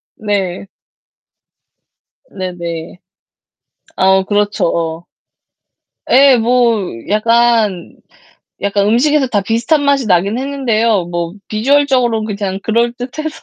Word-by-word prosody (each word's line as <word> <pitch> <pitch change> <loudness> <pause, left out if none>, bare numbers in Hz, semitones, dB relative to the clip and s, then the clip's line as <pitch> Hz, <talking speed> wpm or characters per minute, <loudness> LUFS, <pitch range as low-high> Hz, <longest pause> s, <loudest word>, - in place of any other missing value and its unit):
네. 200 -3 -3 1.6
네네. 175 -2 -6 1.0
아, 190 0 +3
그렇죠. 205 -1 0
어. 165 0 -3 1.1
예, 270 0 +6
뭐 235 -2 +2 0.3
약간 225 -3 +1 0.7
약간 200 0 0
음식에서 270 +5 +2
다 210 -5 0
비슷한 230 - 0
맛이 280 -4 +1
나긴 195 +5 +1
했는데요. 230 -8 0
뭐 170 0 -4 0.2
비주얼적으로 250 -1 +1
그냥 200 -3 -4
그럴듯해서 245 +7 -2
220 Hz, 195 characters per minute, -15 LUFS, 190-245 Hz, 1.6 s, 예